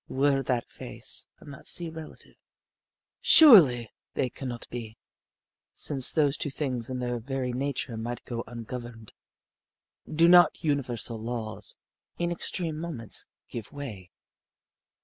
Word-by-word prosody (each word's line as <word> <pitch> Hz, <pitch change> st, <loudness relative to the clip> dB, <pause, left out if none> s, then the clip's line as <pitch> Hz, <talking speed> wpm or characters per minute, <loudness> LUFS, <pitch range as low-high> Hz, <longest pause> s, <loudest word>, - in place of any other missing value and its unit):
Were 135 Hz, 0 st, +2 dB
that 125 Hz, -2 st, -1 dB
face -, -, -4 dB
and 145 Hz, -, -11 dB
that -, -, -12 dB
sea 175 Hz, -, -1 dB
relative? 160 Hz, -1 st, -10 dB, 0.9 s
Surely 150 Hz, -, +8 dB, 0.2 s
they 130 Hz, -2 st, 0 dB
could 135 Hz, -, -6 dB
not 120 Hz, -1 st, -6 dB
be, 115 Hz, -2 st, -6 dB, 0.8 s
since 135 Hz, -4 st, -1 dB
those 145 Hz, -2 st, +2 dB
two 145 Hz, -, -1 dB
things 130 Hz, -4 st, -2 dB
in 130 Hz, -, -3 dB
their 120 Hz, -1 st, -2 dB
very 130 Hz, +1 st, -3 dB
nature 135 Hz, -2 st, -2 dB
might 120 Hz, +2 st, -5 dB
go 115 Hz, -1 st, -4 dB
ungoverned. 115 Hz, -1 st, -8 dB, 1.0 s
Do 165 Hz, +2 st, +5 dB
not 175 Hz, 0 st, +6 dB
universal 125 Hz, -6 st, -1 dB
laws, 115 Hz, -1 st, -5 dB, 0.4 s
in 175 Hz, 0 st, -1 dB
extreme 165 Hz, -2 st, -1 dB
moments, 155 Hz, -10 st, -5 dB, 0.2 s
give 115 Hz, -3 st, -7 dB
way? 110 Hz, -11 st, -7 dB
125 Hz, 130 wpm, -28 LUFS, 120-145 Hz, 1.0 s, Surely